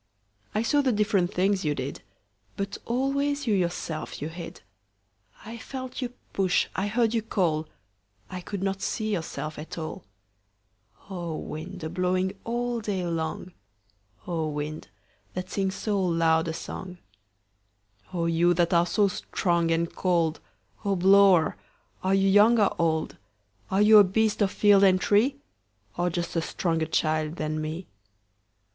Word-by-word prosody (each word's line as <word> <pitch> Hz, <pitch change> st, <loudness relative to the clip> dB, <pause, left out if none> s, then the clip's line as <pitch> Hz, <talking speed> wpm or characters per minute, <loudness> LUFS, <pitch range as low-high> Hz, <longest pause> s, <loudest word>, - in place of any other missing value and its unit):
I 215 Hz, -, +2 dB
saw 290 Hz, +5 st, +3 dB
the 265 Hz, -2 st, +2 dB
different 205 Hz, -4 st, +1 dB
things 190 Hz, +1 st, +1 dB
you 150 Hz, -2 st, 0 dB
did, 130 Hz, +1 st, -5 dB, 0.6 s
But 200 Hz, 0 st, -4 dB
always 280 Hz, +3 st, 0 dB
you 220 Hz, -, +2 dB
yourself 175 Hz, -4 st, -2 dB
you 150 Hz, -, -4 dB
hid.I 100 Hz, -, -13 dB
felt 260 Hz, +2 st, -6 dB
you 245 Hz, -1 st, -3 dB, 0.2 s
push, 190 Hz, -2 st, +2 dB
I 190 Hz, +2 st, 0 dB
heard 225 Hz, +1 st, +1 dB
you 230 Hz, -, +1 dB
call,I 155 Hz, -, -4 dB
could 195 Hz, +1 st, -5 dB
not 195 Hz, 0 st, -1 dB
see 215 Hz, -1 st, -2 dB
yourself 155 Hz, -4 st, -4 dB
at 155 Hz, -, -8 dB
all—O 105 Hz, -, -10 dB
wind, 170 Hz, +4 st, -7 dB
a 160 Hz, -, -3 dB
blowing 185 Hz, +1 st, 0 dB
all 240 Hz, 0 st, -1 dB
day 195 Hz, -4 st, -2 dB
long,O 115 Hz, -, -6 dB
wind, 150 Hz, +1 st, -5 dB, 0.5 s
that 185 Hz, 0 st, -5 dB
sings 190 Hz, -1 st, -1 dB
so 200 Hz, 0 st, -1 dB
loud 165 Hz, -2 st, +2 dB
a -, -, -1 dB
songO 180 Hz, +2 st, -7 dB, 1.3 s
you 170 Hz, +1 st, +3 dB
that 175 Hz, +1 st, +2 dB
are 170 Hz, 0 st, +4 dB
so 205 Hz, +3 st, +3 dB
strong 170 Hz, -3 st, 0 dB
and 165 Hz, 0 st, 0 dB
cold,O 175 Hz, +3 st, -2 dB
blower, 190 Hz, -2 st, +5 dB, 0.4 s
are 190 Hz, +1 st, +2 dB
you 195 Hz, 0 st, +3 dB
young 210 Hz, +4 st, +6 dB
or 205 Hz, -, +3 dB
old? 160 Hz, -2 st, 0 dB, 0.5 s
Are 195 Hz, +2 st, +3 dB
you 215 Hz, 0 st, +8 dB
a -, -, +9 dB
beast 215 Hz, +3 st, +1 dB
of 200 Hz, -, +4 dB
field 205 Hz, 0 st, +4 dB
and 185 Hz, -1 st, +5 dB
tree, 220 Hz, +9 st, +3 dB, 0.6 s
Or 175 Hz, +1 st, 0 dB
just 175 Hz, 0 st, -3 dB
a 165 Hz, -, +2 dB
stronger 165 Hz, -1 st, -1 dB
child 155 Hz, 0 st, 0 dB
than 155 Hz, -1 st, -2 dB
me? 160 Hz, +4 st, -4 dB
180 Hz, 140 wpm, -26 LUFS, 155-200 Hz, 1.3 s, a